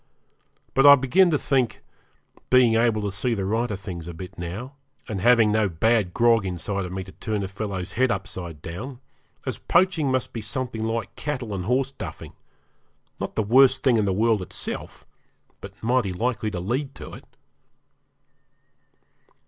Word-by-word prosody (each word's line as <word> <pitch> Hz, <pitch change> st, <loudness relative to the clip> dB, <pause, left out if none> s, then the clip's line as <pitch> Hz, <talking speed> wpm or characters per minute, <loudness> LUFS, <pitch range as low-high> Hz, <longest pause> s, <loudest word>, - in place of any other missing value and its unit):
But 135 Hz, +1 st, +5 dB
I 140 Hz, -, +11 dB
begin 155 Hz, +8 st, +3 dB
to 155 Hz, -, +2 dB
think, 130 Hz, -4 st, 0 dB, 0.7 s
being 125 Hz, -3 st, +5 dB
able 115 Hz, -2 st, +2 dB
to 100 Hz, -, -1 dB
see 115 Hz, +5 st, -1 dB
the 100 Hz, -2 st, -2 dB
right 115 Hz, +5 st, 0 dB
of 100 Hz, -3 st, -4 dB
things 90 Hz, -4 st, -7 dB
a 85 Hz, -, -7 dB
bit 90 Hz, +2 st, -9 dB
now, 95 Hz, +10 st, -6 dB, 0.3 s
and 100 Hz, -5 st, -4 dB
having 115 Hz, -1 st, +5 dB
no 110 Hz, -2 st, +2 dB
bad 105 Hz, +2 st, +1 dB
grog 115 Hz, +1 st, +3 dB
inside 95 Hz, +2 st, -3 dB
of 90 Hz, -, -7 dB
me 95 Hz, 0 st, -4 dB
to 95 Hz, -, -12 dB
turn 105 Hz, 0 st, -3 dB
a -, -, -3 dB
fellow's 100 Hz, -1 st, -5 dB
head 130 Hz, +1 st, +2 dB
upside 95 Hz, -7 st, -5 dB
down, 120 Hz, +10 st, -7 dB, 0.5 s
as -, -, -3 dB
poaching 170 Hz, -6 st, +2 dB
must 130 Hz, -1 st, -1 dB
be 115 Hz, -, -4 dB
something 115 Hz, +1 st, -2 dB
like 115 Hz, -2 st, -3 dB
cattle 130 Hz, -7 st, -4 dB
and 90 Hz, -2 st, -4 dB
horse 130 Hz, +3 st, +1 dB
duffing -, -, -8 dB, 0.9 s
not -, -, -4 dB
the 110 Hz, -, +1 dB
worst 130 Hz, +5 st, +5 dB
thing 125 Hz, -4 st, +4 dB
in 105 Hz, -, +2 dB
the 95 Hz, -, +1 dB
world 110 Hz, +1 st, +2 dB
itself, 90 Hz, -, -6 dB, 0.6 s
but 100 Hz, +1 st, -11 dB
mighty 120 Hz, -4 st, +1 dB
likely 110 Hz, +3 st, -1 dB
to 90 Hz, -, -4 dB
lead 130 Hz, +9 st, -2 dB
to -, -, -9 dB
it. -, -, -11 dB
110 Hz, 175 wpm, -24 LUFS, 95-125 Hz, 0.9 s, I